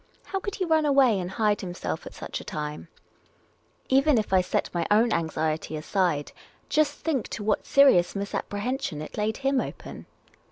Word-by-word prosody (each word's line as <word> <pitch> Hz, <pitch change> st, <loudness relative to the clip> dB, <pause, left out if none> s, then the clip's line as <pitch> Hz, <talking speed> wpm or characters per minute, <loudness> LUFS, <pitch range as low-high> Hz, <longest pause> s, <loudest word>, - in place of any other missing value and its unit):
How 390 Hz, -, -3 dB
could 405 Hz, +1 st, -5 dB
he 370 Hz, -, -1 dB
run 320 Hz, -2 st, +3 dB
away 270 Hz, -6 st, +4 dB
snd 180 Hz, -1 st, -4 dB
hide 210 Hz, 0 st, +1 dB
himself 180 Hz, -2 st, -5 dB
at -, -, -11 dB
such -, -, -6 dB
a -, -, -10 dB
time? 150 Hz, +2 st, -5 dB, 1.0 s
Even 275 Hz, +1 st, +4 dB
if 210 Hz, -3 st, -1 dB
I 185 Hz, -, +6 dB
set 180 Hz, -, -1 dB
my 170 Hz, -2 st, -1 dB
own 220 Hz, +3 st, +4 dB
anxiet}' 160 Hz, -2 st, -1 dB
aside, 155 Hz, -2 st, 0 dB, 0.4 s
just 305 Hz, -2 st, +2 dB
think 285 Hz, -8 st, -1 dB
to 210 Hz, -, -6 dB
what 210 Hz, 0 st, 0 dB
vSerious 275 Hz, -13 st, +5 dB
misapprehension 205 Hz, -, -3 dB
it -, -, -9 dB
laid 215 Hz, +1 st, -1 dB
him 275 Hz, -1 st, +1 dB
open -, -, -8 dB
210 Hz, 170 wpm, -26 LUFS, 175-275 Hz, 1.0 s, I